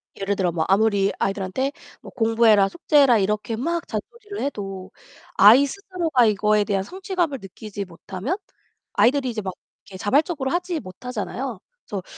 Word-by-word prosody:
예를 200 +1 -1
들어 185 -3 0
뭐 160 -1 -1
아무리 200 0 +3
아이들한테 195 +7 -1 0.3
뭐 - - -11
공부해라, 225 -3 +4
숙제해라 285 - +4
이렇게 210 +3 -1
막 335 +8 -2
잔소리를 420 -4 -6
해도 195 -8 -5 0.5
아이 230 +8 +8
스스로가 335 - 0
이거에 210 0 +3
대한 200 -2 -1
성취감을 360 - -2
느끼지 200 +1 -7
못하면 190 - -5 0.6
아이들이 260 +1 +3
이제 225 -3 -3
막 190 -2 -4 0.3
이렇게 190 - -10
자발적으로 270 - +1
하지 350 -1 -1
못하잖아요. 240 +2 -5 0.3
그래서 195 -3 -4
225 Hz, 385 characters per minute, -23 LUFS, 195-285 Hz, 0.6 s, 아이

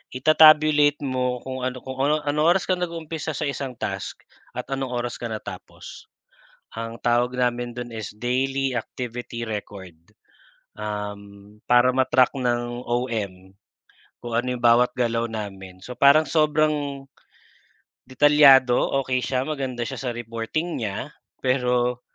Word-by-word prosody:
ita-tabulate 150 0 +5
mo 125 -2 -2
kung 130 -1 -3
ano 125 -1 -6
kung 130 0 -7
ano 150 +2 +1
anong 150 +2 +1
oras 190 - 0
ka 185 -1 -1
nag-umpisa 160 -3 -4
sa - - -3
isang 140 -3 -4
task 100 -3 -5 0.3
at - - -3
anong 135 -1 -2
oras 120 0 -3
ka 120 - -4
natapos. 110 - -9 0.7
Ang 115 +1 -6
tawag 120 +1 +1
namin 120 -1 0
dun 120 -1 -7
is 110 -3 -5
daily 135 +2 -1
activity 120 0 -5
record. 100 -4 -7 0.8
Um, 105 -1 -7
para 125 +1 +5
ma 130 0 +1
track 130 -1 +4
ng 120 -2 -2
OM, 105 -7 -3 0.7
kung 120 - -7
ano 120 +2 0
yung 125 - -5
bawat 120 +1 +4
galaw 115 -2 0
namin. 95 -5 -7
So, 125 +6 -9
parang 140 +4 +5
sobrang 150 -3 +1 1.0
detalyado, 135 -2 +6 0.3
okey 130 -1 0
siya, 130 0 -1
maganda 135 -5 -3
siya - - -6
sa 130 - -2
reporting 120 +9 -4
niya. 110 +7 -4 0.3
pero 125 -1 +1
125 Hz, 135 wpm, -23 LUFS, 115-140 Hz, 1.0 s, detalyado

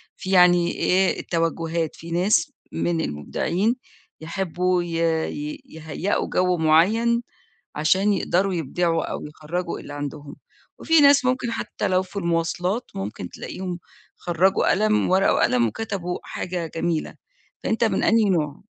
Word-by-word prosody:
في 190 - -6
يعني 175 -1 +5
إيه 190 +1 +1
التوجُّهات، 165 -1 -1
في 165 - -10
ناس 180 +5 +2 0.2
من 85 0 -1
المبدعين 170 - -1 0.5
يحبّوا 180 +1 -1
ي 175 - -6 0.5
ي 150 +1 -6
يهيّئوا 160 +5 -3
جَو 180 -1 +1
معيّن 205 +10 +3 0.5
عشان 190 +7 +2
يقدروا 190 0 +1
يبدعوا 165 +1 0
أو - - -5
يخرّجوا 165 +4 -4
اللي 145 - -9
عندهم، 145 0 -6 0.4
وفي 325 -1 +4
ناس 280 -1 +6
ممكن 255 -2 0
حتّى - - -3
لو 185 0 +2
في 190 +2 -14
المواصلات، 175 +4 -1
ممكن 95 -2 -5
تلاقيهم 180 -2 -6 0.4
خرّجوا 180 +3 +2
قلم 215 0 +2
ورقة 190 +1 +4
وقلم 120 -1 +3
وكتبوا 180 - -4
حاجة 180 -2 -4
جميلة، 165 -1 -2 0.5
فأنت 225 +1 +1
من 220 - +1
أنهي 220 -3 +4
نوع؟ 155 -5 -1
175 Hz, 130 wpm, -23 LUFS, 160-195 Hz, 0.5 s, ناس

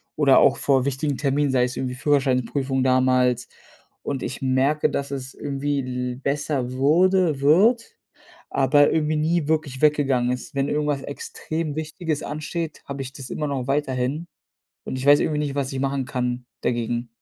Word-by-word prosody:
oder 140 -3 +5
auch - - +4
vor 135 -2 +2
wichtigen 140 +1 -1
Terminen, 140 0 +1
sei 130 -1 +3
es 125 0 -2
irgendwie 125 -1 -3
Führerscheinprüfung 135 -1 +1
damals 130 -1 +2 0.6
und 135 -2 -3
ich 135 - -5
merke, 135 +3 +2
dass 140 0 -2
es 130 -1 -5
irgendwie 145 0 -2
l 125 -1 -3
besser 140 -2 -2
wurde 160 +3 +3
wird, 220 - +3 0.6
aber 145 +2 +4
irgendwie 155 -1 +1
nie 155 0 0
wirklich 155 -4 -1
weggegangen 135 -5 +2
ist. 145 +5 -6
Wenn 140 0 0
irgendwas 150 -2 -1
extrem 155 +2 -5
Wichtiges 155 0 -3
ansteht, 155 +2 -4
habe 140 0 -5
ich 135 0 -7
das 135 -2 -8
immer 150 -1 -2
noch 135 -3 -3
weiterhin, 140 +2 -1 0.6
und - - -4
ich 130 - -4
weiß 145 0 +7
irgendwie 150 -1 0
nicht, 145 -2 -2
was 140 -1 -2
ich 135 - -3
machen 135 0 -1
kann, 125 -1 -3 0.2
dagegen. 120 0 -1
140 Hz, 165 wpm, -23 LUFS, 130-150 Hz, 0.6 s, weiß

